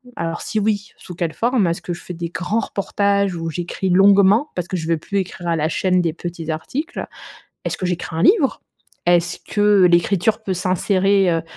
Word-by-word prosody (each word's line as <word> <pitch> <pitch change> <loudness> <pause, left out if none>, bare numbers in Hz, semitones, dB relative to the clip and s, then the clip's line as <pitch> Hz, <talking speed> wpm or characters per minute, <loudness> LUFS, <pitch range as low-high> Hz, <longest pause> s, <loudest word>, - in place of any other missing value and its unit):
Alors, 165 0 -3
si 215 - -2
oui, 205 -1 -1
sous 180 - -10
quelle 165 -2 -2
forme? 235 -4 +1
Est-ce 170 0 -2
que 175 - -4
je 170 - -9
fais 180 - -7
des 170 0 -5
grands 180 +6 -1
reportages 200 -2 0
où 165 -1 -4
j'écris 175 +3 -3
longuement?- 200 +7 +5
parce 175 -1 -2
que 185 - -3
je 160 -2 -5
veux 165 0 +2
plus 200 +6 -2
écrire 175 -2 -5
à 170 - +1
la 155 0 0
chaîne 185 +1 +1
des 165 -2 -1
petits 170 -1 -7
articles. 255 - -4 0.6
Est-ce - - -2
que 185 - -2
j'écris 175 -2 -3
un 165 - 0
livre? 350 - +3 0.5
Est-ce 175 0 +2
que 205 -2 +3
l'écriture 180 +5 +2
peut 195 - -2
s'insérer, 185 +1 +2
heu 165 -1 0
180 Hz, 200 wpm, -20 LUFS, 170-200 Hz, 0.6 s, longuement